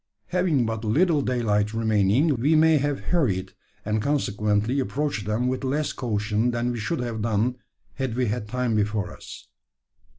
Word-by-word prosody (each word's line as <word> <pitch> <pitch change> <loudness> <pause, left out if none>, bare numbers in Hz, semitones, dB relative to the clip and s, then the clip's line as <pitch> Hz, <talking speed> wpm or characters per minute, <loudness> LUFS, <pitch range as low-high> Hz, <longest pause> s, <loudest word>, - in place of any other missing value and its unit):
Having 175 -8 +2
but 115 0 -3
little 150 +8 +2
daylight 110 -5 0
remaining, 110 +6 +2
we 145 +7 +2
may 160 -1 +5
have 145 0 -1
hurried, 105 - +1 0.3
and 105 +1 0
consequently 110 -2 0
approached 135 -6 -2
them 110 +4 0
with 130 +1 -2
less 145 +3 -1
caution 110 0 -1
than 120 0 -1
we 120 - -4
should 115 +9 -2
have 115 -3 -3
done 115 +3 0 0.4
had 130 -4 -3
we 125 0 +1
had 105 0 -2
time 125 0 -1
before 105 -2 -1
us. - - -11
120 Hz, 160 wpm, -25 LUFS, 105-140 Hz, 0.4 s, may